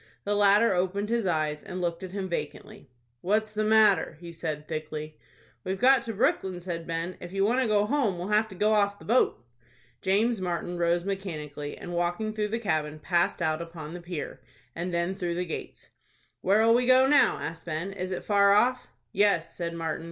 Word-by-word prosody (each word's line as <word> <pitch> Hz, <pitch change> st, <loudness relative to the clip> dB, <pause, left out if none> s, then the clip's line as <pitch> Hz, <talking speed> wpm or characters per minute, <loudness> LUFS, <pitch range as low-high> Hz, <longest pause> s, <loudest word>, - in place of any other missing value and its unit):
The 205 Hz, -, 0 dB
latter 205 Hz, +2 st, +5 dB
opened 190 Hz, +3 st, -1 dB
his 230 Hz, -4 st, 0 dB
eyes, 155 Hz, -3 st, 0 dB
and 185 Hz, -2 st, -7 dB
looked 170 Hz, -1 st, -2 dB
at 185 Hz, -1 st, -7 dB
him 195 Hz, -1 st, -3 dB
vacantly. 175 Hz, -, -6 dB, 0.3 s
"What's 215 Hz, +3 st, 0 dB
the 215 Hz, 0 st, 0 dB
matter?" 215 Hz, -6 st, +4 dB
he 170 Hz, -1 st, -9 dB
said, 155 Hz, -2 st, -5 dB
thickly. 155 Hz, -1 st, -6 dB, 0.4 s
"We've 190 Hz, +1 st, -2 dB
got 265 Hz, +2 st, +5 dB
to 225 Hz, -, -5 dB
Brooklyn," 195 Hz, -, 0 dB
said 170 Hz, -2 st, -5 dB
Ben. 165 Hz, +2 st, -3 dB
"If 175 Hz, -, -9 dB
you 195 Hz, +1 st, +1 dB
want 245 Hz, +5 st, +2 dB
to 255 Hz, -, +1 dB
go 210 Hz, -1 st, +3 dB
home, 230 Hz, -6 st, 0 dB
we'll 180 Hz, +3 st, -5 dB
have 210 Hz, +1 st, +3 dB
to 190 Hz, -, -11 dB
go 210 Hz, +3 st, +2 dB
off 200 Hz, -1 st, +2 dB
the -, -, -15 dB
boat." 215 Hz, -, +2 dB, 0.6 s
James 210 Hz, +3 st, +1 dB
Martin 175 Hz, -1 st, -3 dB
rose 170 Hz, +1 st, +1 dB
mechanically, 155 Hz, -7 st, -5 dB
and, 175 Hz, -, -7 dB
walking 175 Hz, +6 st, -1 dB
through 215 Hz, -1 st, -1 dB
the 225 Hz, +2 st, -2 dB
cabin, 155 Hz, -8 st, -1 dB
passed 170 Hz, +1 st, 0 dB
out 155 Hz, 0 st, 0 dB
upon 165 Hz, -2 st, -8 dB
the 175 Hz, -, -7 dB
pier, 170 Hz, -3 st, -6 dB, 0.3 s
and 175 Hz, +2 st, -3 dB
then 170 Hz, +2 st, 0 dB
through 175 Hz, -3 st, -3 dB
the 180 Hz, +1 st, -2 dB
gates. 165 Hz, -, -7 dB, 0.5 s
"Where'll 220 Hz, +4 st, +4 dB
we 245 Hz, +1 st, +2 dB
go 260 Hz, +1 st, +6 dB
now?" 285 Hz, +2 st, +4 dB
asked 165 Hz, 0 st, -6 dB
Ben. 170 Hz, +4 st, -3 dB
"Is 185 Hz, -1 st, -4 dB
it 185 Hz, -, -4 dB
far 200 Hz, -1 st, +4 dB
off?" 250 Hz, +4 st, +2 dB, 0.2 s
"Yes," 200 Hz, -, +1 dB
said 170 Hz, -1 st, -4 dB
Martin. 165 Hz, -1 st, -3 dB
185 Hz, 200 wpm, -27 LUFS, 170-210 Hz, 0.6 s, go